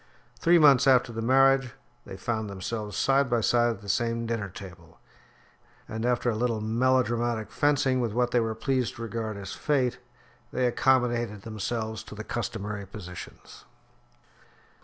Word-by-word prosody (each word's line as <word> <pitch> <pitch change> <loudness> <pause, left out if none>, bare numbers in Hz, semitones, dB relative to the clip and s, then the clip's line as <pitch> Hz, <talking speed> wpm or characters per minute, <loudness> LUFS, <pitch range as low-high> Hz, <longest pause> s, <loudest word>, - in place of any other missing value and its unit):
Three 170 +1 +5
months 145 -4 +6
after 125 -2 +4
the 115 - -4
marriage 135 +1 +4 0.3
they - - -8
found 110 -3 -3
themselves 105 +2 -5
side 135 0 +2
by 120 -1 +1
side 120 +2 +3
at 110 -4 -4
the 105 - -12
same 115 +3 0
dinner 115 -3 -3
table; 85 -3 -12 0.9
and 110 +2 -3
after 125 0 +1
a - - -3
little 115 0 0
melodramatic 120 0 0
fencing 135 -3 +2
with 115 -3 -1
what 120 +2 0
they 120 - +3
were 115 -1 -1
pleased 125 +2 -1
to 115 - -7
regard 110 -2 -4
as 100 -1 -7
fate, 125 -4 0 0.5
they 130 - 0
accommodated 120 -4 +1
themselves 110 0 -4
to - - -10
the 110 - -6
customary 105 -4 -4
positions. 90 -3 -10
115 Hz, 155 wpm, -27 LUFS, 110-125 Hz, 0.9 s, months